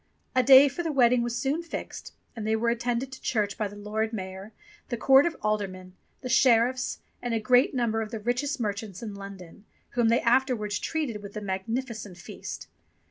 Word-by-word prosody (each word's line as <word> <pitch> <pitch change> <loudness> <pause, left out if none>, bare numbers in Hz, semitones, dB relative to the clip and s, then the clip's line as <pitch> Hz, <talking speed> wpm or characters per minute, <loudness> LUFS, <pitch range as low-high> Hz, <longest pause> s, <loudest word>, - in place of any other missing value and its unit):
A 255 - +5
day 265 +2 +8
for 280 +5 -3
the 330 -2 -2
wedding 250 -3 +4
was 240 0 -2
soon 285 +5 0
fixed; 335 - -7 0.2
and 220 -2 -5
they 220 - +2
were 230 +1 +1
attended 240 +2 -2
to 260 - -10
church 210 -5 0
by 210 - -1
the 200 - -11
Lord 215 +2 -2
Mayor, 190 0 -6 0.4
the 240 - -2
court 270 +6 +6
of 335 - -4
aldermen, 190 -4 -2 0.3
the - - -5
sheriffs, 250 +1 +3 0.2
and 240 -2 -2
a - - +1
great 250 +5 +3
number 225 -3 0
of 220 - -4
the 225 -1 -5
richest 245 +6 -1
merchants 205 -2 -4
in 215 -3 -5
London, 195 -2 -10 0.3
whom 240 -2 +2
they 230 - +3
afterwards 235 -5 +1
treated 285 -10 -3
with 200 +1 -9
a - - -4
magnificent 205 +1 -4
feast. 180 - -8
230 Hz, 190 wpm, -27 LUFS, 205-255 Hz, 0.4 s, day